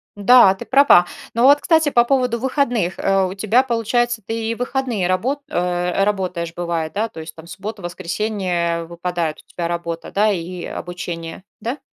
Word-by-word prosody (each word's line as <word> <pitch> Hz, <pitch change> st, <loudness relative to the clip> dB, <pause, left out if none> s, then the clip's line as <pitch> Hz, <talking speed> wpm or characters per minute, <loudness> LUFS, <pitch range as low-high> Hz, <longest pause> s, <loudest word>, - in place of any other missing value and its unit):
Да, 205 Hz, 0 st, +6 dB
ты -, -, -9 dB
права. 270 Hz, -10 st, +6 dB, 0.3 s
Но 235 Hz, -, +1 dB
вот, 285 Hz, +2 st, +7 dB
кстати, 320 Hz, -2 st, +3 dB
по 240 Hz, -4 st, +4 dB
поводу 250 Hz, -2 st, +1 dB
выходных. 245 Hz, -, 0 dB
Э, 195 Hz, -1 st, +2 dB
у 185 Hz, -, -4 dB
тебя, 215 Hz, +6 st, +2 dB
получается, 240 Hz, -1 st, 0 dB
ты 225 Hz, +1 st, -3 dB
и -, -, -2 dB
в -, -, -17 dB
выходные 245 Hz, -6 st, -1 dB
рабо 245 Hz, +11 st, -1 dB
э, 180 Hz, 0 st, 0 dB
работаешь 180 Hz, -5 st, -2 dB
бывает, 170 Hz, -2 st, -3 dB
да? 220 Hz, +3 st, -1 dB
То 165 Hz, -, -11 dB
есть, 160 Hz, 0 st, -9 dB
там, 160 Hz, 0 st, -13 dB
субботу, 200 Hz, +4 st, -7 dB
воскресенье 175 Hz, -1 st, -2 dB
выпадают, 170 Hz, -1 st, -3 dB
у -, -, -23 dB
тебя 170 Hz, -1 st, -3 dB
работа, 170 Hz, -1 st, -4 dB
да? 210 Hz, +2 st, +2 dB
И, 180 Hz, -1 st, -4 dB
э, -, -, -6 dB
обучение, 175 Hz, -1 st, -6 dB, 0.2 s
да? 240 Hz, +7 st, -4 dB
195 Hz, 180 wpm, -20 LUFS, 175-235 Hz, 0.3 s, вот